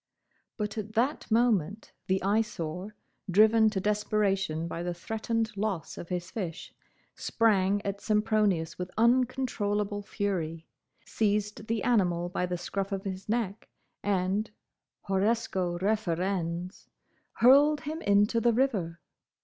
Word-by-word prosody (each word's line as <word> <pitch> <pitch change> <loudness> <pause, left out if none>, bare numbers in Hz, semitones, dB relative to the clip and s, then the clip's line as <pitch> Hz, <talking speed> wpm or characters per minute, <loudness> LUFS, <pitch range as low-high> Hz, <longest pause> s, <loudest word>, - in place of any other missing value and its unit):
But 210 -1 -3
at 215 +1 -6
that 250 +7 0
moment 220 -4 +1 0.2
the 190 0 +1
Eyesore, 195 -2 -1 0.3
driven 220 +3 +5
to 205 -3 -2
desperation 195 -5 0
by 170 - -5
the 175 0 -3
threatened 225 +3 -2
loss 195 -4 -3
of 170 - -8
his 180 0 -3
fish, 180 -7 -5 0.4
sprang 205 -3 +1
at 200 0 -3
Sempronius 210 -7 +1
with 180 0 -4
uncontrollable 225 -4 +1
fury, 170 -6 -3 0.4
seized 210 0 -1
the 225 -2 -1
animal 175 -7 +2
by 180 0 -1
the 180 0 -2
scruff 195 +3 -3
of 195 -1 -3
his 190 0 -6
neck, 220 -3 -2 0.3
and—horresco 195 0 -2
referens—hurled 195 - +1
him 315 +3 -5
into 205 -1 +3
the 235 +1 +3
river. 205 -10 0
205 Hz, 115 wpm, -29 LUFS, 180-220 Hz, 0.4 s, driven